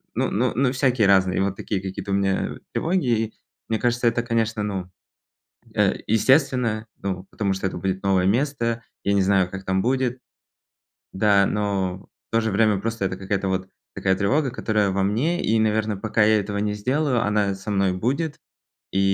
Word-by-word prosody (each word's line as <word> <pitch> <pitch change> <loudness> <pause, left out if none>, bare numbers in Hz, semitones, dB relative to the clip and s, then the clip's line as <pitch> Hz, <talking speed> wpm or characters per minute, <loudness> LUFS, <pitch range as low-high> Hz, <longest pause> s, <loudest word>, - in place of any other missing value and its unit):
Ну - - +1
ну 120 +4 +1
ну 130 0 +2
всякие 130 -5 +2
разные, 95 -2 +3
и - - +2
вот 100 0 0
такие 100 -3 -3
какие-то 95 +1 -5
у - - +2
меня 95 -1 0 0.2
тревоги. 120 - 0 0.4
Мне 110 -1 0
кажется, 120 0 0
это 120 +1 +2
конечно, 115 -2 0
ну, 95 -3 -4 0.8
э, - - +3
естественно, 115 -1 +2 0.2
ну, 95 -1 -3
потому 100 -2 -1
что 95 0 -2
это - - -5
будет 95 0 -2
новое 95 -2 +2
место. 115 +1 0 0.2
Я 100 - +1
не 100 - +3
знаю, 95 -2 +3
как 95 0 -6
там 95 0 +1
будет. 130 0 0 0.9
Да, 100 0 +4
но, 100 -2 -2 0.2
в - - -67
то 115 - +4
же 110 - -1
время 105 0 +3
просто 115 -1 -2
это 95 -1 -2
какая-то 95 0 -2
вот, 95 0 -2 0.3
такая 95 -1 +1
тревога, 130 +8 +1
которая 105 -4 0
во 95 0 0
мне, 135 - 0
и 110 +1 +2
наверное, 110 -1 +1
пока 110 +1 +1
я 110 0 +4
этого 100 0 -3
не 105 0 0
сделаю, 130 +3 0
она 105 -2 +1
со 95 +2 -8
мной 95 -1 +2
будет. 140 - -2 0.5
И 95 - 0
105 Hz, 185 wpm, -23 LUFS, 95-115 Hz, 0.9 s, Да